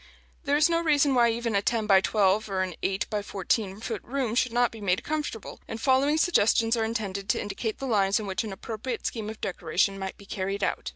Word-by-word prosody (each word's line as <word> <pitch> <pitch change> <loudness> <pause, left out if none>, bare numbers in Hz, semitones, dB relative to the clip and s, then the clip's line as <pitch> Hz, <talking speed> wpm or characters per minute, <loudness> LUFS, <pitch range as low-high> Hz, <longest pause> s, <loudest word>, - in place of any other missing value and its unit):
There 285 0 +2
is 300 - +5
no 335 0 +1
reason 290 -4 +3
why 240 -2 +4
even 230 -1 -1
a 200 - +3
ten 225 +1 0
by 195 -2 +5
twelve 205 +1 +2
or 190 -1 0
an 185 -1 -4
eight 195 +3 -1
by 210 -1 0
fourteen 200 0 -2
foot 225 -2 -4
room 255 -3 -2
should 245 0 +1
not 240 0 +2
be 225 - -11
made 185 -2 0
comfortable; 300 -8 -4
and 225 - -5
the 225 - -11
following 275 +3 +3
suggestions 230 - +3
are 225 - 0
intended 210 -3 -3
to - - +2
indicate 205 +2 -3
the 275 - -5
lines 200 -5 +2
on 215 - -5
which 190 +1 -2
an 215 - -5
appropriate 225 +5 -5
scheme 220 -3 -3
of 220 - -8
decoration 195 +1 0
might 190 0 -5
be 200 - -14
carried 195 0 -3
out. - - -1
220 Hz, 235 wpm, -27 LUFS, 195-245 Hz, -, is